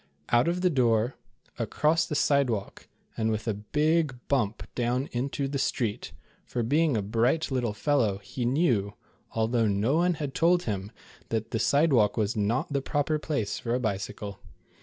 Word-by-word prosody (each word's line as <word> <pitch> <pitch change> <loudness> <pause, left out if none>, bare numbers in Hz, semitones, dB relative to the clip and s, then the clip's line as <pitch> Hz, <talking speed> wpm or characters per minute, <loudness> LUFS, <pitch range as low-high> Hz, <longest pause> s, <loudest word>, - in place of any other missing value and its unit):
Out 120 +3 +4
of 175 +1 0
the 180 -1 +3
door, 120 -3 +2 0.4
across 160 +2 +1
the 150 - -3
sidewalk 135 -8 0 0.3
and 110 0 0
with 110 +1 -2
a 110 - +1
big 150 +7 +1
blimp 120 -6 0
down 125 +3 0
into 135 +3 -2
the 140 0 -3
street, 115 -5 -1 0.3
for 120 - -3
being 145 +2 +2
a 105 - -1
bright 120 +10 +1
little 120 -5 0
fellow, 120 -8 +1
he 100 +5 -6
knew, 120 - +1 0.4
although 115 0 +1
no 105 +9 +1
one 175 +1 +2
had 145 -3 -4
told 175 +2 +3
him, 100 -1 -3 0.4
that 110 0 -2
the 115 - -1
sidewalk 130 -8 +3
was 105 0 0
not 110 +7 0
the 140 - +1
proper 145 +2 0
place 140 -10 -2
for 120 0 -1
a - - 0
bicycle. 100 -2 -4
120 Hz, 165 wpm, -27 LUFS, 110-145 Hz, 0.4 s, Out